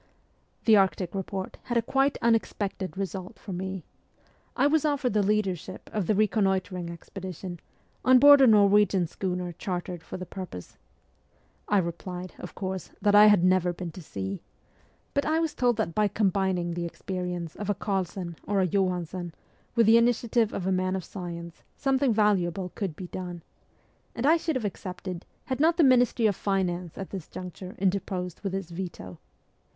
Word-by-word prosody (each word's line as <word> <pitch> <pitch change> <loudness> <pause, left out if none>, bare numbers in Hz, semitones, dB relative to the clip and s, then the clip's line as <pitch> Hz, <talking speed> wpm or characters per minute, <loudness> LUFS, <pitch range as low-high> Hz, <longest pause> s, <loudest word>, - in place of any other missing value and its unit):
The 220 - +7
Arctic 190 -2 +1
report 195 0 -4
had 240 -1 0
a 230 - +2
quite 270 +4 +1
unexpected 205 -6 0
result 190 -1 -5
for 195 - -8
me. 190 0 -4 0.7
I - - +3
was 300 +1 +3
offered 285 -6 +1
the 210 - +3
leadership 195 -3 -1
of 205 -5 -1
the 215 - +3
reconnoitring 190 -4 +1
expedition, 180 0 -7 0.4
on 255 0 +7
board 285 +2 +9
a 265 - +7
Norwegian 205 -3 +5
schooner 180 +1 -3
chartered 175 0 -4
for - - -7
the 185 - -6
purpose. 180 - -8 0.9
I 205 - +3
replied, 180 +1 -3
of 180 - -8
course, 190 -3 -4
that 205 -1 +2
I 210 +1 +9
had 205 -4 +5
never 180 -1 +3
been 175 -1 -6
to 180 - -10
sea; 95 - -5 0.7
but 280 - +1
I 315 +1 +1
was 325 -2 0
told 245 -5 +2
that 215 -7 -1
by 210 +2 +3
combining 190 -4 0
the 170 0 -3
experience 180 -2 -5
of 205 -1 -5
a 205 - +2
Carlsen 185 -3 -3
or 200 -1 +1
a 190 - +3
Johansen 180 -2 -1 0.4
with 230 -1 +5
the 225 +2 +7
initia 235 -1 +2
tive 230 -3 +3
of 180 - -4
a 190 - +1
man 185 0 +1
of 190 - -3
science 170 -2 -7 0.2
something 270 -1 +2
valuable 195 -4 +1
could 190 -7 -3
be 185 - -7
done; 175 -1 -6 0.7
and 235 - -2
I 320 +3 +6
should 320 -2 -2
have 250 -4 -1
accepted 185 -2 -6 0.2
had 260 0 -3
not 325 +3 +4
the 335 - +5
Ministry 250 -3 +4
of 205 -3 +3
Finance 180 -4 -1
at 195 - -6
this 190 -5 -6
juncture 185 0 -8
interposed 185 -2 -2
with 195 -2 -3
its 190 -3 -5
veto. 170 - -7
190 Hz, 175 wpm, -27 LUFS, 180-215 Hz, 0.9 s, board